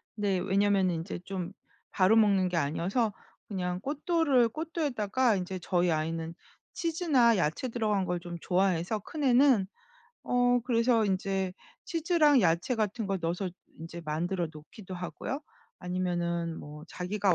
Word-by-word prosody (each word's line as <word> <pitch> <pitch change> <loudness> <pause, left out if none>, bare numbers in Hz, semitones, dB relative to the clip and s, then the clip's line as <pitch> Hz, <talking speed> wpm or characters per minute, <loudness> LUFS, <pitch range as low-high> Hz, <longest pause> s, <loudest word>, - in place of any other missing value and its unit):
네. 205 -3 0
왜냐면은 195 0 +2
인제 165 +2 -5
좀 185 -2 -4 0.4
바로 190 +3 +4
먹는 200 -4 +4
게 175 - -1
아니어서 180 - 0 0.3
그냥 180 -3 -3
cotto를 290 -4 +2
cotto에다가 260 - 0
인제 185 0 -3
저희 175 -1 +1
아이는 165 +1 -2 0.4
치즈나 310 - +2
야채 165 +8 0
들어간 215 -5 0
걸 180 -1 -1
좀 175 0 -7
좋아해서 185 +2 +1
큰 300 - -6
애는, 255 -6 +5 0.6
어 245 0 +3
그래서 230 -2 +3
인제 190 -1 -1 0.3
치즈랑 320 -4 +3
야채 170 +8 +2
같은 220 0 -1
걸 195 -1 -1
넣어서 175 +3 -1 0.3
이제 165 +1 -7
만들어 170 +4 -1
놓기도 185 +6 -10
하고요 180 +9 -5 0.4
아니면은 175 -2 -2
뭐 150 +1 -10
자기가 190 +1 0
195 Hz, 320 characters per minute, -29 LUFS, 175-240 Hz, 0.6 s, 애는